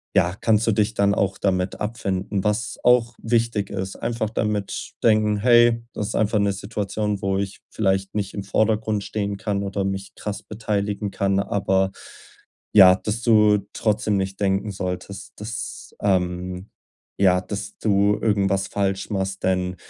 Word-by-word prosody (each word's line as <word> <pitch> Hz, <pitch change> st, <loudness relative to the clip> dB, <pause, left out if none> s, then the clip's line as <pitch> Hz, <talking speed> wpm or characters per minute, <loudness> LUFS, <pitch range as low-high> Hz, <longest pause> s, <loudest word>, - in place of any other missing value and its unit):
ja, 90 Hz, -1 st, +3 dB
kannst 110 Hz, 0 st, +2 dB
du 115 Hz, -, +4 dB
dich 105 Hz, +1 st, +1 dB
dann 100 Hz, -1 st, +2 dB
auch 95 Hz, -1 st, 0 dB
damit 95 Hz, -1 st, 0 dB
abfinden? 100 Hz, -3 st, -2 dB
Was 105 Hz, +3 st, -1 dB
auch 120 Hz, -1 st, +4 dB
wichtig 115 Hz, -3 st, 0 dB
ist, 95 Hz, 0 st, -4 dB
einfach 115 Hz, -2 st, -2 dB
damit 105 Hz, -2 st, -2 dB
denken: 105 Hz, -2 st, +3 dB
„Hey, 120 Hz, +1 st, +5 dB
das 105 Hz, 0 st, -3 dB
ist -, -, -4 dB
einfach 105 Hz, 0 st, +2 dB
'ne 100 Hz, -1 st, +2 dB
Situation, 105 Hz, 0 st, -3 dB
wo 95 Hz, 0 st, 0 dB
ich 100 Hz, 0 st, -4 dB
vielleicht 95 Hz, -2 st, 0 dB
nicht 100 Hz, -2 st, -2 dB
im 100 Hz, -, -4 dB
Vordergrund 110 Hz, +1 st, 0 dB
stehen 100 Hz, -1 st, -3 dB
kann 100 Hz, 0 st, -2 dB
oder 100 Hz, 0 st, -2 dB
mich 95 Hz, 0 st, -4 dB
krass 105 Hz, -1 st, -5 dB
beteiligen 105 Hz, -1 st, -2 dB
kann.“ 100 Hz, 0 st, +1 dB
Aber, 95 Hz, -1 st, +1 dB, 0.8 s
ja, 95 Hz, -3 st, +9 dB
dass 110 Hz, +4 st, -4 dB
du 105 Hz, -3 st, +5 dB
trotzdem 105 Hz, -1 st, 0 dB
nicht 95 Hz, 0 st, -3 dB
denken 100 Hz, +1 st, 0 dB
solltest, 95 Hz, +1 st, -5 dB
dass 110 Hz, +2 st, -6 dB
ähm 90 Hz, -1 st, -1 dB, 0.5 s
ja, 90 Hz, -2 st, +4 dB
dass 100 Hz, +2 st, -6 dB
du 100 Hz, -1 st, +2 dB
irgendwas 100 Hz, -2 st, +1 dB
falsch 95 Hz, -1 st, -1 dB
machst, 95 Hz, -1 st, -2 dB
denn 90 Hz, -1 st, 0 dB
100 Hz, 155 wpm, -23 LUFS, 95-105 Hz, 0.8 s, ja